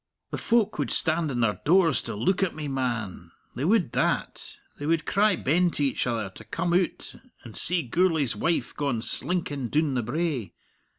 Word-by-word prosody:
The -, -, -3 dB
folk 230 Hz, -3 st, +1 dB
would -, -, 0 dB
stand 160 Hz, -1 st, +1 dB
in 125 Hz, -3 st, -1 dB
their 105 Hz, -3 st, 0 dB
doors 165 Hz, -3 st, +4 dB
to 115 Hz, -, -6 dB
look 185 Hz, -, +1 dB
at 190 Hz, -3 st, 0 dB
me, 155 Hz, -1 st, -4 dB
man 120 Hz, -7 st, -3 dB, 0.2 s
they 130 Hz, -, -4 dB
would 190 Hz, -, +2 dB
that -, -, -1 dB, 0.2 s
they 145 Hz, -, -4 dB
would 165 Hz, 0 st, +1 dB
cry 205 Hz, 0 st, +3 dB
ben 175 Hz, +4 st, +2 dB
to 150 Hz, -, -2 dB
each 135 Hz, -1 st, 0 dB
other 110 Hz, -5 st, -2 dB
to -, -, -12 dB
come 170 Hz, +1 st, -2 dB
oot 180 Hz, 0 st, 0 dB, 0.3 s
and 115 Hz, -3 st, -11 dB
see 175 Hz, 0 st, 0 dB
Gourlay's 155 Hz, -2 st, +1 dB
wife 165 Hz, +10 st, -1 dB
gaun 135 Hz, -6 st, -1 dB
slinkin' 145 Hz, -9 st, -2 dB
doon 150 Hz, -2 st, +1 dB
the 125 Hz, -, 0 dB
brae. 130 Hz, -, -2 dB
150 Hz, 185 wpm, -26 LUFS, 120-175 Hz, 0.3 s, doors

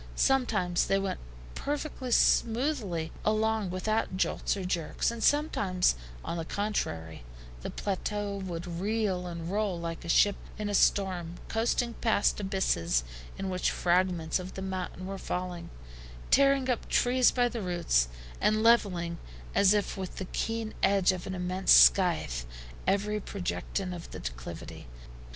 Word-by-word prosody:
Sometimes 215 Hz, -10 st, +2 dB
they 195 Hz, -, +3 dB
went 195 Hz, -1 st, -2 dB, 0.3 s
perfectly 285 Hz, -2 st, -4 dB
smoothly 225 Hz, -, +2 dB
along 215 Hz, -1 st, +1 dB
without 185 Hz, +2 st, -1 dB
jolts 200 Hz, -, 0 dB
or 190 Hz, -, -4 dB
jerks, 175 Hz, +3 st, -1 dB
and 235 Hz, -1 st, -7 dB
sometimes 205 Hz, -, +2 dB, 0.3 s
on 170 Hz, -, -3 dB
the 165 Hz, -, -2 dB
contrary, 85 Hz, -, -3 dB, 0.4 s
the -, -, -5 dB
plateau 205 Hz, +1 st, -3 dB
would 175 Hz, -3 st, -5 dB
reel 185 Hz, +1 st, -1 dB
and 170 Hz, 0 st, -5 dB
roll 200 Hz, -4 st, -1 dB
like 165 Hz, 0 st, -5 dB
a 170 Hz, -, -7 dB
ship 205 Hz, +4 st, +4 dB, 0.2 s
in 210 Hz, -1 st, -3 dB
a -, -, -2 dB
storm, 185 Hz, -4 st, +2 dB
coasting 235 Hz, +1 st, 0 dB
past 220 Hz, -3 st, +1 dB
abysses 190 Hz, -, 0 dB, 0.3 s
in 195 Hz, -, -3 dB
which 185 Hz, 0 st, +1 dB
fragments 175 Hz, -2 st, +1 dB
of 185 Hz, +1 st, -8 dB
the 190 Hz, -, -5 dB
mountain 185 Hz, -1 st, -4 dB
were 195 Hz, 0 st, -5 dB
falling, 180 Hz, -2 st, -4 dB, 0.6 s
tearing 275 Hz, -1 st, +4 dB
up 250 Hz, -3 st, -1 dB
trees 250 Hz, 0 st, +4 dB
by 245 Hz, -1 st, +2 dB
the 235 Hz, -2 st, -4 dB
roots, 170 Hz, -, +1 dB, 0.3 s
and 215 Hz, +1 st, +2 dB
leveling, 180 Hz, -7 st, +3 dB, 0.3 s
as 200 Hz, -1 st, +5 dB
if 205 Hz, -1 st, +1 dB
with 190 Hz, -1 st, -5 dB
the 190 Hz, -, -5 dB
keen 225 Hz, +3 st, -3 dB
edge 195 Hz, -2 st, +4 dB
of 185 Hz, -1 st, -5 dB
an 190 Hz, -, -4 dB
immense 185 Hz, +1 st, 0 dB
scythe, -, -, +5 dB, 0.4 s
every 210 Hz, +2 st, +1 dB
projection 190 Hz, -1 st, -3 dB
of 170 Hz, -1 st, -8 dB
the -, -, -8 dB
declivity. -, -, -7 dB
190 Hz, 145 wpm, -29 LUFS, 175-215 Hz, 0.6 s, as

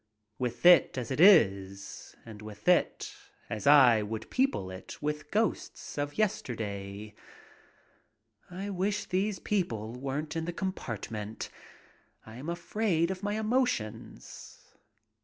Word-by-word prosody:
With 120 Hz, +2 st, -3 dB
it 175 Hz, -7 st, +7 dB
as 125 Hz, -1 st, -4 dB
it 130 Hz, -, -2 dB
is, 100 Hz, -, +3 dB
and 110 Hz, -2 st, -10 dB
with 105 Hz, -, -11 dB
it 180 Hz, -1 st, +2 dB, 0.4 s
as 110 Hz, +5 st, -3 dB
I 130 Hz, -6 st, +7 dB
would 110 Hz, +1 st, -6 dB
people 260 Hz, -, 0 dB
it 95 Hz, +1 st, -9 dB
with 150 Hz, 0 st, -3 dB
ghosts 220 Hz, +2 st, -2 dB
of 145 Hz, 0 st, -3 dB
yesterday. 105 Hz, -, -3 dB, 1.4 s
I 195 Hz, +3 st, -5 dB
wish 200 Hz, +2 st, -1 dB
these 195 Hz, +2 st, -1 dB
people 115 Hz, -, -2 dB
weren't 140 Hz, +5 st, -4 dB
in 165 Hz, 0 st, -2 dB
the 175 Hz, -, -4 dB
compartment. 110 Hz, -, -5 dB, 0.7 s
I 110 Hz, +1 st, -11 dB
am 140 Hz, +6 st, -6 dB
afraid 170 Hz, 0 st, 0 dB
of 190 Hz, -1 st, -5 dB
my 205 Hz, 0 st, -2 dB
emotions. 220 Hz, -, -3 dB
145 Hz, 120 wpm, -30 LUFS, -, 1.4 s, it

